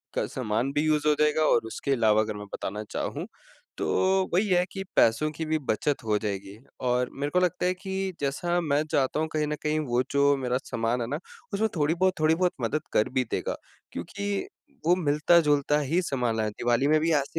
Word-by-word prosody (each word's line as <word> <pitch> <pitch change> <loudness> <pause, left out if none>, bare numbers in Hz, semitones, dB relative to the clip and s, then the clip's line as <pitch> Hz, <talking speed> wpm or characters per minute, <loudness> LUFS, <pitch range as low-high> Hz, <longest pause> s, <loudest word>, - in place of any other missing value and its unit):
का - - +1
सामान 120 +1 -1
भी 145 - +1
यूज़ 150 -1 +2
हो 150 - +5
जाएगा 150 +1 +3
और 115 - +4
उसके 125 +4 -4
अलावा 110 -4 +4
अगर 110 0 -2
मैं 105 - -7
बताना 105 +2 -4
चाहूँ 155 +4 -3 0.5
तो - - -2 0.5
वही 195 +5 +3
है 180 -1 +4
कि 195 - -5
पैसों 115 +7 +4
की 160 +1 -5
भी 155 0 +1
बचत 130 +5 0
हो 105 -1 +2
जाएगी। 100 -1 -4 0.3
और 125 0 +1
मेरे 145 +1 -1
को 180 - +4
लगता 180 0 0
है 180 - +2
कि 190 0 -4
जैसा 175 +6 0
मैं 150 -2 +1
चाहता 135 +2 +1
हूँ 160 - 0
कहीं 155 -1 0
न 150 - -1
कहीं 155 0 +1
वो 120 +1 +1
जो 140 0 +4
मेरा 125 -1 0
सामान 115 +1 -1
है 115 - -2
ना 145 +5 -3 0.3
उसमें 220 +2 +1
थोड़ी 150 -1 +2
बहुत 185 +1 +2
थोड़ी 155 +1 +4
बहुत 180 +1 +2
मदद 140 +7 0
कर 105 - +3
भी 130 - +4
देगा। - - -1 0.4
क्योंकि 200 - -3 0.4
वो 175 +2 +5
मिलता-जुलता 150 -2 +3
ही 155 +5 +1
सामान 125 -9 -1
है। 110 -1 0
दिवाली 120 +5 +1
में 155 +1 +4
भी 165 +2 +1
ऐसे 140 -2 0
145 Hz, 210 wpm, -27 LUFS, 120-165 Hz, 0.5 s, हो